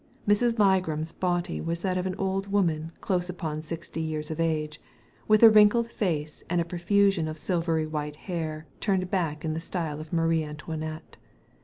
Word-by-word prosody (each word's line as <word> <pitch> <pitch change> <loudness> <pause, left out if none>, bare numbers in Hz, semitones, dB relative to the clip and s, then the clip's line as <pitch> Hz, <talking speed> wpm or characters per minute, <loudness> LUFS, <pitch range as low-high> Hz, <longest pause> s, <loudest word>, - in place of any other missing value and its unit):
Miss 205 +1 +3
Ligram's 190 -9 +2
body 175 -1 -1
was 170 +1 -3
that 185 -2 0
of 185 0 -1
an 185 - -3
old 195 0 -2
woman 165 -5 +1
close 180 -1 0
upon 160 -4 -4
sixty 165 +1 -6
years 155 -1 -3
of 160 - -5
age, 155 -2 -1 0.5
with 215 +1 +5
a 225 - +12
wrinkled 215 +2 +5
face, 155 -9 -2
and 175 0 +1
a 170 - +1
profusion 180 0 +2
of 155 0 -5
silvery 165 -2 0
white 150 -1 -4
hair 160 -2 -4
turned 185 -3 0
back 165 -5 -1
in 155 - -1
the 160 - -2
style 165 -3 -3
of 155 0 -9
Marie 165 -1 +2
Antoinette. 155 +1 -6
165 Hz, 175 wpm, -27 LUFS, 155-190 Hz, 0.5 s, a